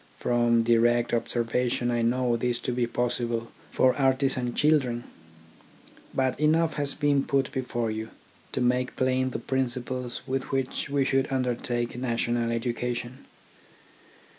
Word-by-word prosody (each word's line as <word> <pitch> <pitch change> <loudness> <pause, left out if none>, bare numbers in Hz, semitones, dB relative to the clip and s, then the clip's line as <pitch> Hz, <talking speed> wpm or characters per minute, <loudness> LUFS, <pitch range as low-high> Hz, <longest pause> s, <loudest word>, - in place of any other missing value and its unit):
From 120 -1 +2
direct 120 +1 +3
observation 120 +1 0
I 120 -1 +1
know 120 +1 +2
this 120 +1 0
to - - -2
be 120 -1 0
possible 120 -1 -1 0.2
for 130 -1 +3
artisan 130 -2 +1
children. 135 -6 +2 1.1
But 130 0 0
enough 160 +1 +3
has 145 -1 -1
been 145 -2 +2
put 135 -2 0
before 120 -3 -2
you, 110 +1 -4 0.4
to - - -1
make 125 +1 +1
plain 130 0 +1
the - - -4
principles 125 -1 -2
with 135 +1 -3
which 135 0 -2
we 140 -1 +1
should 135 0 +1
under 130 -2 +1
take 120 0 -3
national 120 -1 0
education. 120 +2 -3
125 Hz, 135 wpm, -27 LUFS, 120-130 Hz, 1.1 s, direct